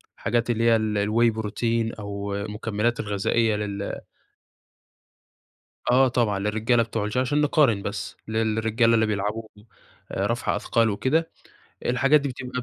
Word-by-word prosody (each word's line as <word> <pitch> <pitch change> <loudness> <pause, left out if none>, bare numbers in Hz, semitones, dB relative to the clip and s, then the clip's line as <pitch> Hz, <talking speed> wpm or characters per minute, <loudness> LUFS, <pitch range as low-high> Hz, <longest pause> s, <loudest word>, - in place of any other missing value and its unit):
حاجات 120 0 -1
اللي 115 -1 +1
هي 115 0 +5
ال 110 -1 0
الواي 110 +3 +3
بروتين 115 +1 -1
أو 100 -1 -5
المكملات 105 +3 -2
الغذائية 105 +2 +1
لل 100 -1 -4 1.9
آه 130 +1 +5
طبعًا، 115 -5 0
للرجالة 110 +4 +1
بتوع 110 -2 -3
الش 105 +4 -3
عشان 140 +4 +1
نقارن 140 -8 +3
بس، 100 0 -5
للرجالة 110 +1 +1
اللي 110 - +3
بيلعبوا 105 +1 -2 0.7
رفع - - -1
أثقال 115 -1 +1
وكده، 130 +11 0 0.6
الحاجات 135 +4 +4
دي 140 - -2
بتبقى 125 0 -5
110 Hz, 130 wpm, -24 LUFS, 105-120 Hz, 1.9 s, هي